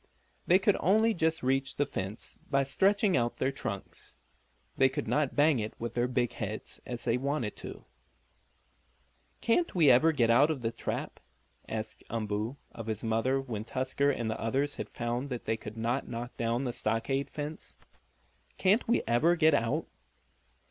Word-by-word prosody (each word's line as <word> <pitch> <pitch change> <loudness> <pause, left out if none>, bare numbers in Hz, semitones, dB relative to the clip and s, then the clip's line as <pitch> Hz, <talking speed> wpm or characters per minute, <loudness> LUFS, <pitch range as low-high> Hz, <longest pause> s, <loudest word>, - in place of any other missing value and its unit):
They 180 - +7
could 195 +1 +2
only 220 +5 +4
just 160 -4 0
reach 135 +1 +1
the 145 - +1
fence 100 -5 -5
by 135 0 +3
stretching 195 +7 +2
out 120 -2 0
their 130 - +1
trunks; 105 -7 -6 0.6
they 135 0 +5
could - - -4
not 150 -3 +1
bang 145 -2 +4
it 110 0 -5
with 115 0 -4
their 120 0 +1
big 125 -1 0
heads 110 0 -5
as 120 -1 -5
they 120 0 +2
wanted 140 -5 -2
to. - - -9 1.6
"Can't 235 - +1
we 155 -6 +6
ever 155 +7 +5
get 120 -7 +3
out 140 +6 +5
of 145 -6 -2
the 115 - 0
trap?" - - -4 0.5
asked 110 0 -5
Umboo 110 +3 -2
of 115 -1 -8
his 110 0 -3
mother 115 +4 +1
when 120 -6 -4
Tusker 130 +4 0
and 120 -5 -1
the 110 - -3
others 135 +6 0
had - - -5
found 120 +3 -3
they 115 -3 -2
could 110 0 -9
not 120 +4 -1
knock 120 +1 -6
down 115 +2 0
the 125 -3 -2
stockade 135 +6 -1
fence. 150 +1 -6 0.8
"Can't 200 +5 +3
we 235 - +2
ever 155 +9 +3
get 160 -2 +4
out?" 115 -5 +1
130 Hz, 170 wpm, -30 LUFS, 115-145 Hz, 1.6 s, They